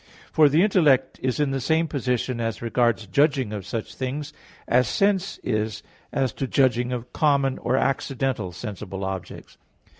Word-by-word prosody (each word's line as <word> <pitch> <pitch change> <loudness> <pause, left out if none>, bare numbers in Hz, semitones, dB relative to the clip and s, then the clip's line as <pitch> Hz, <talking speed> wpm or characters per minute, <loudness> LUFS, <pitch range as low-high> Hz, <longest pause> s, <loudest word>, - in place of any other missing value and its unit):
For 155 -2 +5
the 155 +6 +4
intellect 145 -10 +3
is 130 +2 -1
in 145 -2 +1
the 135 -1 -1
same 160 +5 +2
position 125 -4 -1
as 115 -1 -2
regards 115 -1 +1
judging 130 - +1
of 100 -3 -6
such 115 -2 -4
things, 140 +3 -4 0.3
as 125 0 +3
sense 195 +2 +1
is 110 -2 -2 0.3
as 130 -4 0
to 135 - -3
judging 125 -2 +2
of 125 0 -5
common, 140 -3 +2
or 130 - 0
accidental, 135 -7 -1
sensible 95 -1 -6
objects. 95 -2 -7
130 Hz, 155 wpm, -24 LUFS, 115-140 Hz, 0.3 s, For